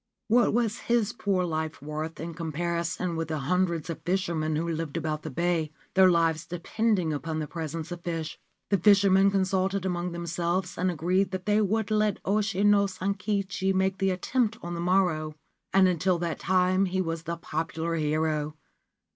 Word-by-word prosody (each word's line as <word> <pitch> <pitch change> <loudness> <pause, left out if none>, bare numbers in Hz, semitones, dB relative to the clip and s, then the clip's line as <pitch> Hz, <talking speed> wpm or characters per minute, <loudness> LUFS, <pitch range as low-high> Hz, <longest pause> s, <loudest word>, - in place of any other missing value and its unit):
What 240 +2 +4
was 230 0 0
his 235 -2 +2
poor 200 -5 0
life 160 -2 -3
worth 155 +2 -5
in 165 +2 -5
comparison 170 +2 -2
with 165 -1 -2
the 160 -1 -2
hundreds 170 +3 0
of 165 -2 -5
fishermen 165 -3 -1
who 165 +2 -1
lived 165 -2 -3
about 155 -1 -2
the 160 - -6
bay, 165 +1 0 0.2
their 190 -1 +6
lives 165 -2 +2
depending 180 0 0
upon 155 +2 -3
the 155 - -2
presence 165 +1 -5
of 175 -1 -6
fish? 165 -2 -4 0.3
The 200 - +3
fishermen 195 0 +5
consulted 190 0 0
among 180 -1 -2
themselves, 170 +2 -2
and 185 +1 0
agreed 180 +4 +1
that 185 -1 -5
they 210 +1 +3
would 215 +1 0
let 210 -2 +2
Oshi 205 -1 +1
no 205 -1 +5
Sankichi 195 0 -1
make 190 0 +1
the 195 - +2
attempt 225 +5 0
on 175 0 -4
the 170 - -4
morrow; 170 -4 +1 0.4
and 190 -1 +5
until 180 +1 +1
that 170 -1 -3
time 185 +1 +2
he 185 0 -1
was 165 -3 -2
the 170 +1 -3
popular 165 0 -3
hero. 155 -1 0
175 Hz, 170 wpm, -27 LUFS, 165-195 Hz, 0.4 s, their